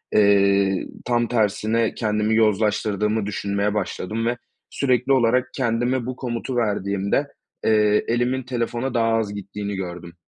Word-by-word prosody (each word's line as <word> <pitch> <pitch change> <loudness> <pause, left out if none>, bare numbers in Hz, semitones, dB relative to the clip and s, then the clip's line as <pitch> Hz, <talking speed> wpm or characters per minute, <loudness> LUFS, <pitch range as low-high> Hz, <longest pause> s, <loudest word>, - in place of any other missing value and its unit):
eee, 100 -2 +3 0.2
tam 120 -1 +1
tersine 110 0 +1
kendimi 105 -1 0
yozlaştırdığımı 105 -1 +1
düşünmeye 100 0 -1
başladım 105 +2 -3
ve 120 +1 0 0.3
sürekli 130 -1 +1
olarak 125 0 +2
kendime 120 0 0
bu 130 0 -4
komutu 125 0 -4
verdiğimde, 100 +3 0 0.4
eee, 105 -1 +3
elimin 120 +2 0
telefona 120 +1 -2
daha 115 -1 +2
az 110 -2 0
gittiğini 100 0 -5
gördüm. 90 -2 -6
110 Hz, 125 wpm, -22 LUFS, 100-120 Hz, 0.4 s, eee